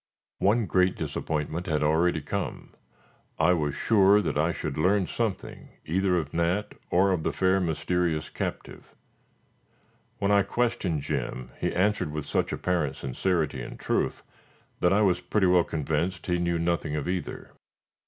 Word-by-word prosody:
One 110 +3 +3
great 90 -1 +2
disappointment 80 +3 -3
had 75 -3 0
already 80 +2 +2
come. 100 +7 -5 0.6
I 80 +3 +4
was 75 -4 -1
sure 100 -2 +5
that 95 - -1
I 80 +3 +2
should 75 -3 -4
learn 95 +5 +2
something 110 0 -4 0.2
either 90 +2 +1
of 75 -4 -3
Nat, 85 +5 0 0.2
or 95 +2 +3
of 90 -3 0
the - - -1
fair, 95 +1 +2
mysterious 85 -1 0
captive. - - -6 1.2
When 100 0 0
I 100 0 +5
questioned 105 - -1
Jim, 60 -2 -3
he - - 0
answered 100 -4 +1
with 75 -1 -4
such - - 0
apparent 85 -7 -1
sincerity 80 +5 -1
and - - -8
truth, - - -1 0.6
that 90 - +3
I 105 +2 +4
was 90 -3 +2
pretty 105 -3 +1
well 90 -1 +5
convinced 80 +4 -2
he 90 -1 0
knew 85 -1 0
nothing 85 -2 -1
of 75 0 -3
either. 90 0 -4
90 Hz, 155 wpm, -27 LUFS, 80-95 Hz, 1.2 s, sure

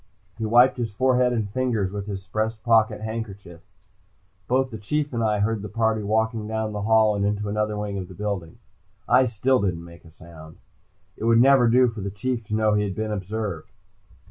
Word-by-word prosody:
He 110 - -1
wiped 120 +4 +5
his 115 -3 -3
forehead 125 +2 +2
and 110 -4 -1
fingers 110 -4 -1
with 100 0 -5
his 95 -2 -6
breast 110 +3 -3
pocket 110 -2 +3
handkerchief. 100 -6 -7 0.9
Both 130 +1 +1
the 110 - -7
Chief 145 +7 -2
and 115 -1 -1
I 105 -2 +1
heard 110 0 0
the 105 - -7
party 110 +1 0
walking 110 +1 -1
down 110 0 -2
the 105 - -4
hall 110 0 +3
and 100 - -1
into 105 0 -1
another 105 0 -1
wing 105 -1 -3
of 90 - -6
the 95 - -12
building. 100 -2 -4 0.5
I 130 +1 +4
still 125 +3 +1
didn't 85 -4 -2
make 85 0 -14
a 85 - -15
sound. 80 -1 -14 0.6
It 110 - -5
would 115 0 +5
never 130 -1 +6
do 125 +2 +5
for 115 -3 -5
the 100 - -3
Chief 115 +5 -3
to 105 0 -3
know 110 -1 +2
he 105 0 +2
had 95 -2 -4
been 110 0 -3
observed. 100 -3 -4
110 Hz, 205 wpm, -24 LUFS, 100-115 Hz, 0.9 s, never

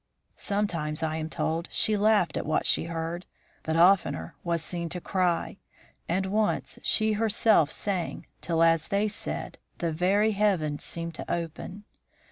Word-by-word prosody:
Sometimes, 170 -7 -2
I 160 0 -1
am 160 0 -4
told, 165 +2 -2
she 215 - +3
laughed 210 -3 +3
at - - -3
what 155 - +1
she - - +2
heard, 165 +1 -4 0.3
but 160 - -2
oftener 170 - +3
was 170 -2 -1
seen 170 0 -2
to 180 - -4
cry, 180 -1 -1 0.5
and 185 +3 +1
once 210 +2 -1
she 220 -1 +3
herself 215 -6 +3
sang 190 -5 -2 0.2
till, 165 -1 +1
as 165 -1 +3
they 205 +1 +1
said, 210 - -3 0.2
the 170 -1 -1
very 195 +7 +2
heavens 190 -8 0
seemed 170 0 -4
to - - -6
open. 170 +4 -5
175 Hz, 150 wpm, -27 LUFS, 165-205 Hz, 0.5 s, she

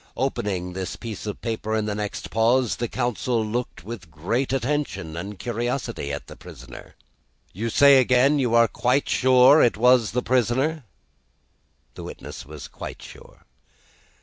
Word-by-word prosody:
Opening 90 -3 -2
this 95 0 -4
piece 110 -2 -7
of 105 - -6
paper 110 -1 -2
in 110 -1 0
the 105 - -2
next 105 0 -5
pause, 120 +2 +2
the 120 - -2
counsel 120 -1 -1
looked 120 -2 -4
with 100 -5 -8
great 95 - -2
attention 125 - -2
and 100 +4 -6
curiosity 120 - -3
at 70 - -5
the - - -12
prisoner. 65 0 -12 0.6
"You 115 +5 -3
say 140 +3 +6
again 130 +3 +3
you 120 -3 +1
are 115 0 +6
quite 125 +5 0
sure 130 +3 +5
that 120 - +4
it - - -12
was 125 -1 +4
the 125 - 0
prisoner?" 130 +5 0 1.1
The - - -10
witness - - -9
was 75 -3 -9
quite - - -9
sure. - - -15
115 Hz, 155 wpm, -24 LUFS, 105-125 Hz, 1.1 s, say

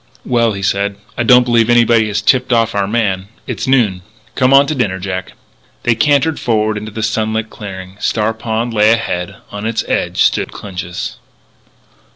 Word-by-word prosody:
"Well," 115 -3 +2
he 100 0 -6
said, 100 +1 0 0.2
"I - - -2
don't 125 +1 +6
believe 120 -1 +2
anybody 115 -2 +4
has 105 0 -2
tipped 130 +2 +2
off 115 -1 +2
our 100 -1 0
man. 100 -4 -1 0.2
It's - - -4
noon. 115 -9 +2 0.3
Come 130 +1 +2
on 140 +1 +7
to 150 - -2
dinner, 105 -9 -1
Jack." 95 0 -5 0.5
They 120 - +3
cantered 145 +4 +2
forward 110 -2 0
into 105 +1 -6
the 110 +1 -4
sunlit 110 0 -1
clearing. 95 -2 -9
Star 110 +1 0
Pond 115 +1 -3
lay 105 0 +4
ahead. 100 -4 -3 0.2
On 105 0 -6
its 115 0 -1
edge - - 0
stood - - +1
Clinch's. 90 -3 -6
110 Hz, 175 wpm, -16 LUFS, 100-120 Hz, 0.5 s, on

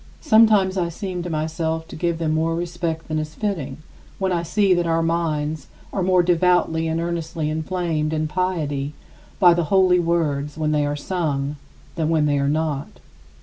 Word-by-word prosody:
Sometimes, 215 - +4
I 175 -2 0
seem 180 0 -5
to 175 - -5
myself 160 +1 -2
to - - -8
give 170 0 -1
them 160 -1 0
more 165 +1 +1
respect 170 -1 -3
than 155 0 -1
is 155 0 -5
fitting, 165 -11 -3 0.4
when 190 -1 -1
I 175 -1 +1
see 195 +3 +2
that 175 -1 +1
our 165 0 +1
minds 155 -3 -1 0.3
are 195 - -1
more 185 -1 +3
devoutly 175 -2 +2
and 160 +1 -1
earnestly 165 -2 -2
inflamed 160 -1 -1
in 155 0 -1
piety 150 -5 -2 0.5
by 175 -2 +7
the 170 -1 0
holy 185 +1 +4
words 150 -4 0
when 155 -1 0
they 150 -1 +1
are 145 - -1
sung 145 -3 -2 0.4
than 160 -1 0
when 160 -2 +2
they 145 -1 +2
are 140 0 +1
not. 150 -2 -2
165 Hz, 180 wpm, -22 LUFS, 155-175 Hz, 0.5 s, by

